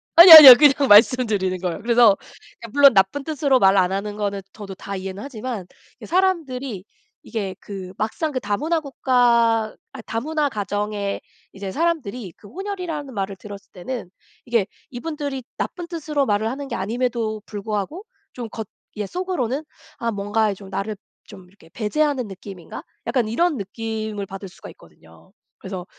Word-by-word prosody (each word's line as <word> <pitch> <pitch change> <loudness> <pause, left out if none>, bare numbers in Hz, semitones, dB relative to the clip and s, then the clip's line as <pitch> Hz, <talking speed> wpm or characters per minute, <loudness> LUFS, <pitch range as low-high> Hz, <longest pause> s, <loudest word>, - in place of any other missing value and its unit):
아뇨, 340 0 +11
아뇨. 285 -6 +14
그냥 280 0 +4
말씀드리는 210 -4 +4
거예요. 180 -3 -3
그래서 235 -2 +5
그러니까 230 - -15
물론 280 -2 +7
나쁜 200 +8 +2
뜻으로 280 -4 +1
말 195 +1 +4
안 185 -1 +3
하는 205 +2 -4
거는 200 -1 -3
저도 200 -3 -9
다 200 +1 -7
이해는 190 +1 -6
하지만 240 -6 -6 0.3
이게 - - -11
사람들이 275 - -1 0.4
이게 200 -5 -5
그 190 -2 -9
막상 260 +9 -2
그 260 - -2
다문화 290 +11 -1
국가 235 -6 +1 0.2
아 - - -8
다문화 295 +6 -1
가정에 205 -1 -3 0.3
이제 195 -1 -6
사람들이 250 - -2
그 205 - -16
혼혈이라는 345 - -6
말을 195 -2 -3
들었을 200 +1 -12
때는 205 +1 -6 0.4
이게 235 -5 +1 0.3
이분들이 285 0 -5
나쁜 350 -1 -5
뜻으로 305 -4 -2
말을 215 -1 0
하는 275 +3 -6
게 - - -3
아님에도 225 +1 -2
불구하고 210 - -5 0.3
좀 235 -3 -7
겉 220 -2 -7 0.3
예 210 - -2
속으로는 310 - -3 0.3
'아 230 -1 -2
뭔가 205 +1 0
이 - - -5
좀 195 0 -13
나를 210 +3 -4 0.3
좀 190 -4 -14
이렇게 185 -4 -21
배제하는 265 +3 -1
느낌인가?' 190 -3 -10 0.2
약간 245 -5 0
이런 310 +7 0
느낌을 215 0 -5
받을 195 0 -9
수가 - - -13
있거든요. 80 - -20 0.3
그래서 190 -2 -7
225 Hz, 355 characters per minute, -22 LUFS, 200-275 Hz, 0.4 s, 아뇨